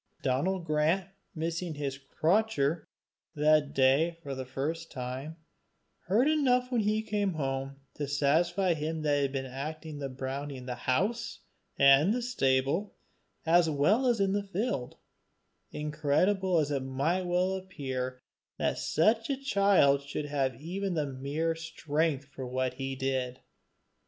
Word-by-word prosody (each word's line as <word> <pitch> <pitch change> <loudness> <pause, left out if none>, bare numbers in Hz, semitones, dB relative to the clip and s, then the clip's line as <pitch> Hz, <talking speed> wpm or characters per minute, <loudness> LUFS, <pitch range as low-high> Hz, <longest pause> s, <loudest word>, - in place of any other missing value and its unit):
Donal 140 +9 +1
Grant, 165 +2 +1 0.3
missing 165 +1 -3
his 140 -2 -4
"cratur" 160 +1 +1 0.5
that 150 -1 +3
day 140 +6 +3
for 140 - -4
the 130 -1 -5
first 155 +6 -3
time, 130 +5 -5 0.7
heard 220 - +3
enough 255 -5 +2
when 240 -3 +2
he 215 +1 +1
came 205 -3 0
home 135 -2 -3 0.2
to 145 - -4
satisfy 170 +6 +2
him 160 0 -3
that 145 -1 +2
he - - +1
had 140 -1 0
been 135 -1 -3
acting 150 +3 -6
the 140 -1 -3
brownie 135 +2 -5
in 125 - -9
the 125 - -3
house 195 - -1 0.4
and 140 +9 +6
the 250 - -2
stable 140 - +1 0.5
as 165 0 +4
well 185 - +3
as 240 -3 +2
in 195 -1 +2
the 205 - +1
field, 195 - -3 0.7
incredible 155 +6 +1
as 150 -2 +1
it 140 - +1
might 145 +8 -1
well 180 +2 +1
appear 130 -9 -4 0.3
that - - 0
such 220 - +2
a 275 - 0
child 200 - +4
should 140 +1 -4
have 140 -3 0
had 115 - -17
even 160 -5 -3
mere 155 +4 0
strength 160 -3 -1
for 135 -2 -8
what 130 0 -1
he 135 0 -4
did. 130 -1 -2
150 Hz, 145 wpm, -30 LUFS, 135-185 Hz, 0.7 s, and